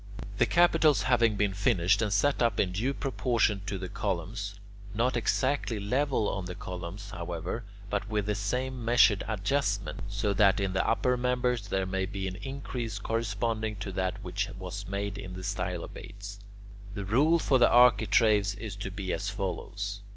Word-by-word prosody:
The - - +4
capitals 165 -4 +4
having 120 -4 +3
been 100 -1 +1
finished 95 0 +2
and 105 -2 0
set 125 +9 +2
up 115 -3 +2
in 90 - +2
due 110 +9 0
proportion 120 -7 0
to 100 0 -2
the 95 0 -5
columns 100 +2 -3 0.4
(not 120 +3 +1
exactly 120 0 0
level 125 +2 +1
on 95 -2 -2
the 90 0 -6
columns, 90 +3 -7
however, 85 +5 -4 0.2
but 105 +1 -2
with 105 -2 0
the 105 - 0
same 125 +5 -2
measured 115 -3 +4
adjustment, 100 - -1
so 105 0 -1
that 100 +1 +4
in 95 -1 -1
the 95 - +1
upper 125 +2 +2
members 125 -3 0
there 95 -1 0
may 95 0 -1
be 95 -1 -4
an 95 0 -5
increase 130 -4 -5
corresponding 110 0 -1
to 100 0 -5
that 95 0 -2
which 95 +2 -2
was 95 +2 -6
made 100 +1 -3
in 95 - -7
the 95 - -7
stylobates), 100 +2 -5 0.6
the 100 -2 -4
rule 145 - +4
for 135 -5 +2
the 120 - +6
architraves 110 -3 +4
is 105 0 -6
to - - -4
be 95 -1 -4
as 100 - -2
follows. 100 0 -4
105 Hz, 170 wpm, -29 LUFS, 95-120 Hz, 0.6 s, the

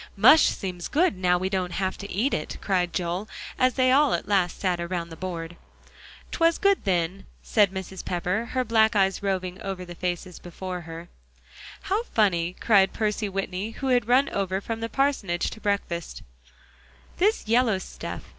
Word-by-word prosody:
"Mush 315 - +7
seems 180 -3 -4
good 315 - +2
now 180 -1 +2
we 185 +1 -1
don't 185 -2 -2
have 190 0 -1
to 200 - -7
eat 230 +9 0
it," 155 - -3
cried 180 -3 0
Joel, 180 +4 -3 0.3
as 255 0 +3
they 255 -1 +3
all 285 +1 +4
at - - -5
last 190 -4 +1
sat 180 -3 0
around 170 -1 -3
the 165 - -9
board. 170 -2 -6 0.7
"'Twas 330 0 +2
good 400 - +2
then," 185 0 -1 0.2
said 205 -3 +3
Mrs. 190 0 -6
Pepper, 180 +5 -1
her 255 - +1
black 220 -2 +3
eyes 195 -1 +2
roving 190 -1 -2
over 190 -3 -5
the 175 - -9
faces 180 0 -4
before 180 +1 -6
her. 165 +1 -9 0.7
"How 405 +4 0
funny," 180 - +1
cried 195 -4 +4
Percy 210 -1 -1
Whitney, 195 +2 -4
who 270 - -2
had 245 -4 +2
run 255 +3 +4
over 190 -1 -1
from 225 +3 -5
the 230 0 -3
parsonage 230 -10 0
to 220 - -10
breakfast, 200 -5 -2 0.9
"this 410 - +1
yellow 230 -2 +3
stuff 185 - -7
is." - - -20
195 Hz, 175 wpm, -25 LUFS, 180-225 Hz, 0.9 s, Mush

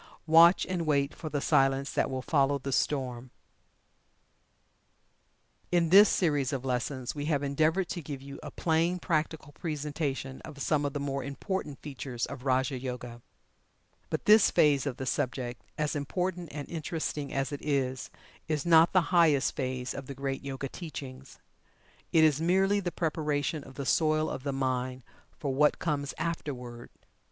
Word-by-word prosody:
"Watch 165 +3 +7
and 175 -3 -2
wait 140 -1 +2
for 160 - -7
the 145 -2 -2
Silence 135 0 +2
that - - 0
will 130 -1 -3
follow 140 -2 +2
the 135 0 -5
Storm." 130 -3 -1 2.4
In 170 -2 +3
this 200 +2 +9
series 145 -6 +1
of 135 -2 -3
lessons 130 0 -2
we 145 -1 -4
have 145 -2 0
endeavored 155 +6 +1
to 175 - -4
give 140 -2 -6
you 140 +1 -10
a - - -7
plain, 165 +2 +1
practical 155 -3 -2
presentation 145 -3 -4
of 150 -3 -10
some 145 +1 +1
of 140 - -2
the 145 - -2
more 140 -1 -2
important 145 +2 -4
features 130 -4 -4
of 130 0 -9
"Raja 130 0 +1
Yoga." 125 -2 -6 0.9
But - - -3
this 210 0 +7
phase 145 -2 +3
of 130 -3 -3
the 130 - -4
subject, 125 -1 -2 0.2
as 150 0 -1
important 180 +4 -2
and 145 -1 -6
interesting 155 -3 -4
as 135 +1 -1
it 145 - -5
is, 135 -3 -1 0.4
is 155 -3 -1
not 165 0 +6
the 185 -1 +2
highest 160 -6 +4
phase 130 -2 -3
of 135 -1 -7
the 140 - -7
great 135 0 -3
Yoga 135 0 -4
teachings. 135 -4 -9 0.7
It 160 - +5
is 155 -1 +4
merely 190 +4 +3
the 175 -3 -3
preparation 150 -3 -1
of 135 -1 -13
the 140 - -5
soil 155 +3 +2
of - - -5
the 140 +1 -2
mind 130 -1 -2 0.3
for 140 -3 -2
what 150 +2 +3
comes 145 -3 -2
afterward. 130 -7 -5
145 Hz, 165 wpm, -29 LUFS, 135-160 Hz, 2.4 s, this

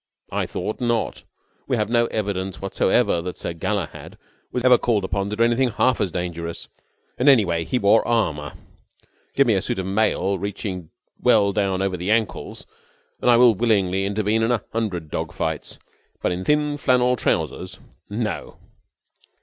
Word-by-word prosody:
I - - -1
thought 110 - -4
not. 120 -2 -1 0.4
We - - +1
have 105 - 0
no 120 -1 +3
evidence 95 -5 -3
whatsoever 95 -3 +1
that 90 +1 -6
Sir - - -4
Galahad 95 +1 -4 0.3
was 125 - -2
ever 125 -1 +6
called 110 -5 +1
upon 100 +1 -2
to 105 - -3
do 115 - +2
anything 120 +2 +2
half 125 +2 +1
as 100 -4 0
dangerous. 85 -2 -4 0.5
And, 130 +3 +5
anyway, 85 -11 +3
he 125 - 0
wore 105 0 +4
armour. 80 - 0 0.8
Give 140 - +5
me 115 - +3
a 95 - +1
suit - - -3
of 95 - -2
mail 100 -1 +1
reaching 95 -3 -5 0.3
well 100 -1 +4
down 95 -2 0
over 95 -2 -1
the 90 +3 -4
ankles, 110 -1 -1 0.6
and - - +2
I 120 - +7
will 120 -1 +7
willingly 95 -3 +1
intervene 105 +2 0
in 115 - +1
a 120 - 0
hundred 95 -9 -3
dog - - -3
fights. - - -3 0.4
But - - 0
in 90 +1 -3
thin 150 0 +1
flannel 125 -2 +3
trousers - - -2 0.3
no!" 110 +1 -4
105 Hz, 165 wpm, -22 LUFS, 95-120 Hz, 0.8 s, I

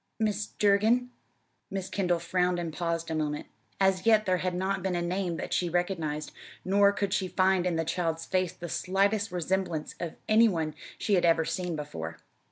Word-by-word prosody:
"Mis' 215 -1 0
Durgin." 220 +4 +3 0.6
Miss 195 -1 -3
Kendall 180 -3 +1
frowned 180 +1 0
and 170 -2 -3
paused 165 -1 -2
a - - 0
moment. 150 -1 -2 0.3
As 190 -1 +3
yet 215 -1 +5
there 185 -1 +2
had 180 0 -1
not 190 +1 -1
been 185 0 -1
a 175 - 0
name 175 -1 -1
that - - -4
she 175 - +1
recognized, 165 -4 -1 0.3
nor 200 +2 +5
could 200 -1 -1
she 190 - 0
find 185 0 +2
in 175 - 0
the 165 0 0
child's 165 -1 -1
face 185 -1 0
the 175 - -7
slightest 200 +5 +1
resemblance 180 -2 -1
to 170 -2 -4
any 225 +2 +6
one 160 -5 -2 0.2
she 210 - -1
had 180 -3 +4
ever 165 -1 +4
seen 180 -1 -2
before. 80 - -6
180 Hz, 185 wpm, -29 LUFS, 165-195 Hz, 0.6 s, any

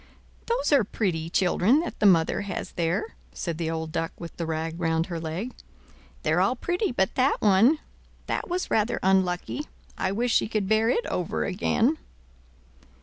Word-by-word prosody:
"Those 475 -3 0
are 280 -5 +5
pretty 175 -6 -2
children 190 - +3
that 345 - -6
the 210 - +5
mother 165 -4 +3
has 200 -2 -5
there," 175 - -1 0.2
said 170 -2 -4
the 165 -1 -1
old 160 -1 -3
Duck 165 +1 -2
with 170 - -8
the 165 - -4
rag 160 +1 -3
round 165 -1 +1
her 170 -2 -5
leg. 165 +10 -4 0.7
They're - - +2
all - - +2
pretty 360 +1 -1
but 190 -6 0
that 265 +2 +2
one; 215 +9 +5 0.5
that - - -3
was 360 +1 -2
rather 220 +2 +1
unlucky. 190 +9 +1 0.3
I 190 - 0
wish 235 +3 0
she - - +3
could 215 -3 -1
bear 220 +2 +3
it 475 - +1
over 180 - -2
again." 235 +9 +1
190 Hz, 170 wpm, -26 LUFS, 165-240 Hz, 0.7 s, are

